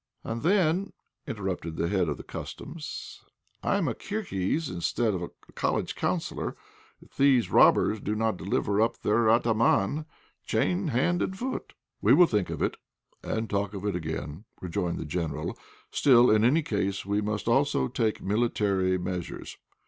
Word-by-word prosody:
"And 115 +1 -4
then," 185 +1 +2 0.3
interrupted 95 -6 -4
the 85 - 0
head 90 -3 +1
of 75 - -2
the - - -9
Customs, - - -7 0.4
"I'm - - +1
a - - 0
Kirghiz 165 - -2
instead 105 +3 0
of 90 - -3
a 85 - -4 0.2
College - - -1
Counsellor - - -2 0.5
if - - -23
these 135 -4 +4
robbers 110 - +5
do 105 +1 -2
not 110 -1 +1
deliver 100 +2 0
up 115 +1 +1
their 110 +2 +3
atáman, 115 +5 +2 0.4
chained 180 -1 0
hand 160 +8 +1
and 190 - -2
foot." 255 +5 -4 0.3
"We - - +6
will 180 - +8
think 105 - 0
of - - -2
it, - - -1 0.4
and 110 0 -2
talk 100 0 -1
of 100 - -5
it 105 - 0
again," 80 +2 -5
rejoined 85 -1 -2
the - - -5
General. 75 -1 -3 0.4
"Still, 125 -3 +5
in 110 0 +4
any 150 +7 +4
case, 100 -5 -1
we 100 +1 0
must 105 +1 -3
also 140 +4 +2
take 115 -3 -1
military 100 -3 +1
measures. 90 -1 -5
105 Hz, 155 wpm, -28 LUFS, 95-130 Hz, 0.5 s, will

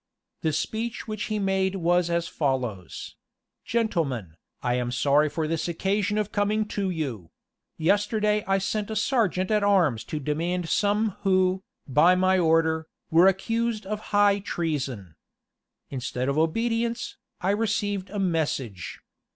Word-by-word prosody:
The 160 - +1
speech 220 +11 -3
which 215 -1 -3
he 215 - -2
made 195 -1 +1
was 175 -1 +2
as 170 0 0
follows: 125 - -3 0.5
"Gentlemen, 160 - -1 0.3
I 125 - +1
am 125 0 0
sorry 140 +5 +3
for 155 +1 -2
this 165 +1 -1
occasion 200 +4 0
of 210 -1 -1
coming 210 +1 +1
to 200 -2 -1
you. 130 - -4 0.5
Yesterday 210 +4 +2
I 195 0 +3
sent 205 +2 -2
a 220 - -3
serjeant 215 -5 +1
at 210 -1 +3
arms 175 - +3
to 155 - -4
demand 165 +4 -2
some 210 +1 +2
who, 185 -1 +2 0.3
by 150 +7 +5
my 185 0 +3
order, 160 -1 +2 0.2
were 170 +3 +7
accused 225 +3 0
of 210 +2 -3
high 205 0 +4
treason. 135 - -3 0.8
Instead 130 0 -2
of 140 - 0
obedience, 230 +7 0 0.2
I 190 - +1
received 205 -2 -1
a 205 - -6
message. 150 - -2
185 Hz, 140 wpm, -26 LUFS, 155-210 Hz, 0.8 s, were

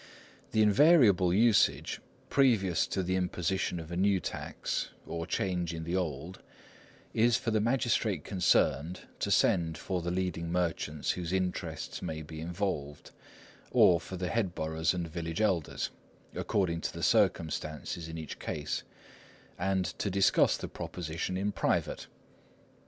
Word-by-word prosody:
The 110 - +4
invariable 105 - +5
usage, 110 +3 +3 0.3
previous 110 - +3
to 95 - -1
the 95 +1 0
imposition 90 0 -1
of 80 0 -8
a - - -3
new 95 +1 +3
tax, - - -3 0.2
or 85 0 -4
change 90 -3 -1
in 80 - -5
the 85 +2 -2
old, 85 0 -3 0.7
is 115 +1 +4
for 115 - -2
the 110 -1 +2
magistrate 115 - +1
concerned 90 -4 +1 0.2
to - - -1
send 80 -3 +2
for 95 -2 -3
the 85 - -3
leading 90 -2 -2
merchants 80 -4 -1
whose 90 -1 -4
interests 90 -4 -2
may 80 0 -4
be 80 +1 -9
involved, 85 -5 -3 0.6
or 85 -2 +5
for 95 - -7
the 90 0 -2
headboroughs 85 -6 0
and 85 -2 -2
village 80 +1 -4
elders, 95 -8 0 0.4
according 85 -4 0
to - - -2
the - - -6
circumstances 80 +1 0
in 80 0 -6
each 80 -3 -7
case, 75 -1 -3 0.8
and 95 0 +1
to 100 - 0
discuss 95 0 +3
the - - -5
proposition 85 +2 -4
in 100 +2 0
private. - - -1
90 Hz, 140 wpm, -30 LUFS, 80-95 Hz, 0.8 s, invariable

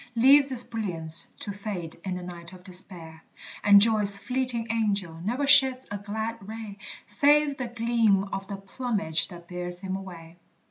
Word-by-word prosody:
Leaves 275 +4 +5
its 245 -2 0
brilliance 165 -8 +2
to 205 - -6
fade 195 -5 -7
in 190 -2 -4
the 180 - -7
night 175 0 -10
of 180 -1 -14
despair, 175 -3 -3 0.4
And 200 -1 +7
joy's 210 -2 +5
fleeting 250 +1 -1
angel 200 -7 -2
ne'er 245 +8 -1
sheds 265 -2 +4
a 205 - -4
glad 220 +3 -5
ray, 210 0 -9 0.3
Save 285 +6 +2
the 255 - -4
gleam 230 -4 +1
of 195 0 -5
the 200 - -6
plumage 195 -5 -2
that 175 -2 -13
bears 180 0 -3
him 190 -1 -4
away. 175 -3 -10
205 Hz, 165 wpm, -26 LUFS, 180-230 Hz, 0.4 s, And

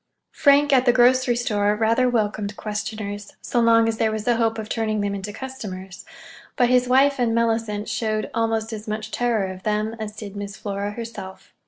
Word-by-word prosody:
Frank, 285 0 +4
at 260 -1 +4
the - - +8
grocery 250 0 +4
store, 210 -3 +1
rather 230 +4 +2
welcomed 210 -3 -1
questioners—so 210 +1 -4
long 230 -1 +5
as 225 -1 -2
there 220 -1 +2
was 215 0 -4
a 240 -1 +3
hope 225 -1 +1
of 220 -1 -5
turning 215 -2 -1
them 200 0 -1
into 200 +1 -5
customers; 205 -7 -8 0.5
but 245 -1 +3
his 250 0 +3
wife 270 +2 +4
and 230 -2 +1
Mellicent 225 -2 0
showed 215 -1 -1
almost 225 0 -1
as 215 +1 -7
much 215 0 -4
terror 235 -5 0
of 185 0 -9
them 215 +2 -1
as 210 -1 -5
did 205 -2 -8
Miss 200 0 -6
Flora 200 0 -4
herself. 210 -5 -8
220 Hz, 185 wpm, -23 LUFS, 210-240 Hz, 0.5 s, the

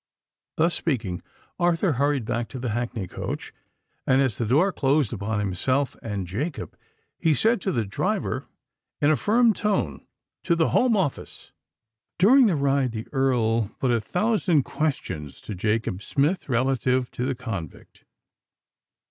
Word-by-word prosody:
Thus 165 +2 +3
speaking, 115 - -2 0.4
Arthur 175 +1 +2
hurried 140 -2 +1
back 115 +1 -2
to 135 - -8
the 125 -1 -3
hackney 115 -3 -3
coach, - - -5 0.5
and 130 0 +4
as 130 -7 +1
the 115 - 0
door 155 - +3
closed 140 -4 +1
upon 105 0 -2
himself 125 +8 0
and 105 -4 -4
Jacob, 130 - -4 0.4
he 160 -2 +3
said 225 - +2
to 190 - -1
the 115 -9 0
driver 100 - -2 0.5
in 145 +1 +4
a - - +4
firm 225 - +3
tone, 210 0 -1 0.4
"TO 170 - +2
THE 165 -1 +2
HOME 245 -3 +3
OFFICE!" 165 -9 -3 0.7
During 240 +7 +6
the 185 - +2
ride, 140 -3 +1
the 110 0 -5
Earl 115 -5 +1
put 130 - +1
a 115 -2 +2
thousand 180 - +1
questions 125 - -3
to - - -6
Jacob 105 0 -1
Smith 145 - 0
relative 130 0 +1
to 125 - -4
the 130 0 -1
convict. 100 - -7
130 Hz, 150 wpm, -25 LUFS, 115-160 Hz, 0.7 s, During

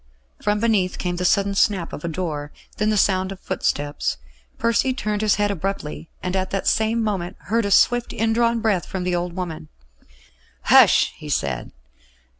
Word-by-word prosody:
From 210 0 +1
beneath 210 -5 +1
came 175 -1 -2
the 180 - -2
sudden 200 +2 +2
snap 195 -3 +1
of - - -7
a - - -2
door; 155 -4 -4 0.3
then 210 +1 +1
the 215 - +1
sound 190 -1 +2
of 195 - -8
footsteps. 145 - -2 0.4
Percy 230 +3 +1
turned 210 -4 -2
his 215 -2 +3
head 205 0 +1
abruptly, 180 -4 -4
and 180 +1 -2
at 190 0 -1
the 195 - -2
same 225 +1 +1
moment 195 -3 -2 0.2
heard 230 -1 +2
a - - -1
swift 240 +4 +3
indrawn 230 +1 +1
breath 210 -6 0
from 190 -1 -4
the 180 0 0
old 175 0 -2
woman. 170 -3 -5 1.0
"Hush!" - - +6
he - - -9
said. 65 -3 -2
195 Hz, 175 wpm, -22 LUFS, 175-215 Hz, 1.0 s, Hush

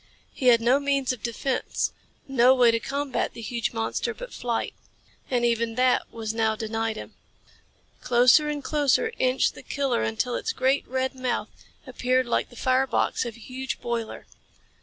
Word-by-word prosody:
He 255 - -1
had 235 -2 +6
no 250 +4 +4
means 275 -2 0
of 240 - -10
defense, 245 +3 -2 0.3
no 260 -1 +5
way 245 -2 +5
to 230 - 0
combat 275 +1 -2
the 230 - -7
huge 235 +1 -2
monster 225 -1 -2
but - - -9
flight. 235 -2 -2 0.6
And 245 -2 +1
even 230 -1 0
that 255 +1 +2
was 225 -1 -4
now 220 -1 +1
denied 225 0 -2
him. - - -9 0.9
Closer 250 +5 +5
and 295 -1 -3
closer 300 - +1
inched 255 +1 +2
the - - -11
killer 275 - -1
until 110 - -1
its - - -2
great, 265 +2 +1
red 260 +1 -1
mouth 255 -2 -2 0.4
appeared 255 +1 0
like 235 - 0
the 245 - -15
fire 260 +2 +2
box - - 0
of 230 - -7
a - - -15
huge 260 +3 -5
boiler. 235 -2 -4
250 Hz, 170 wpm, -25 LUFS, 230-265 Hz, 0.9 s, had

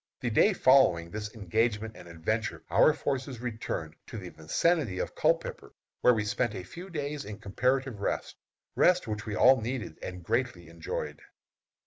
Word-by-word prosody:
The 120 -3 -1
day 200 - +5
following 130 - +4
this 105 +1 -5
engagement 110 +2 0
and - - -12
adventure 95 +7 -2
our - - +6
forces 135 -4 -3
returned 110 -9 -4
to - - -7
the 95 -4 -7
vicinity 110 - 0
of - - -3
Culpepper, - - -1 0.3
where 125 - +6
we 110 -1 -1
spent 120 0 0
a 90 - -5
few 175 - -10
days 150 -3 -3
in 105 0 -7
comparative 125 +3 0
rest 100 - -2 0.4
rest 180 -5 +4
which 105 0 -4
we 105 - -2
all 130 +2 +6
needed 115 -7 -4
and 90 -1 -7
greatly 115 -5 -1
enjoyed. 85 -1 -5
110 Hz, 160 wpm, -29 LUFS, 100-130 Hz, 0.4 s, our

